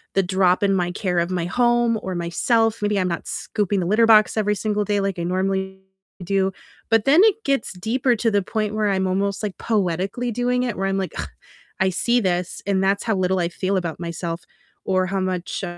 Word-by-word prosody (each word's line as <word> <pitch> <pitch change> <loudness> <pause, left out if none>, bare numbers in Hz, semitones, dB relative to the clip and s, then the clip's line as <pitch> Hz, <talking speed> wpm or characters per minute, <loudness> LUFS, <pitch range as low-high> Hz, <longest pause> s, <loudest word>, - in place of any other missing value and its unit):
the 195 - +3
drop 185 +1 +2
in 195 -1 +3
my 175 -2 0
care 180 -2 -1
of 170 +2 -1
my 175 -2 -1
home 240 +2 +2
or 190 -1 -4
myself, 225 +6 +1
maybe 210 0 0
I'm 185 - +1
not 170 - -4
scooping 205 -2 -1
the - - -2
litter 220 +3 +4
box 215 0 +5
every 210 -1 +1
single 210 0 -1
day 205 0 0
like 195 -3 -2
I - - -2
normally 190 +1 -2 0.4
do, 195 +1 +1 0.4
but 225 -1 +3
then 300 +7 +6
it 440 0 +3
gets 275 -4 0
deeper 240 +7 0
to 230 - +1
the 205 -1 +2
point 215 +2 -2
where 215 -1 +1
I'm 190 -1 0
almost, 195 +2 -1
like, 205 -3 -4
poetically 200 +3 -1
doing 245 +2 0
it, 235 -4 -2
where 195 - -1
I'm 195 - 0
like, 190 -1 -3
"Ugh, - - -4 0.5
I 190 -1 +3
see 240 +7 +1
this," 180 -2 -2
and 195 -1 +1
that's 200 +1 +1
how 220 - +1
little 185 0 +1
I 170 - +1
feel 190 +2 -1
about 170 -3 -3
myself 170 0 -4 0.4
or 185 -1 +1
how 195 +1 -1
much, 185 +1 -3
195 Hz, 215 wpm, -22 LUFS, 185-220 Hz, 0.5 s, then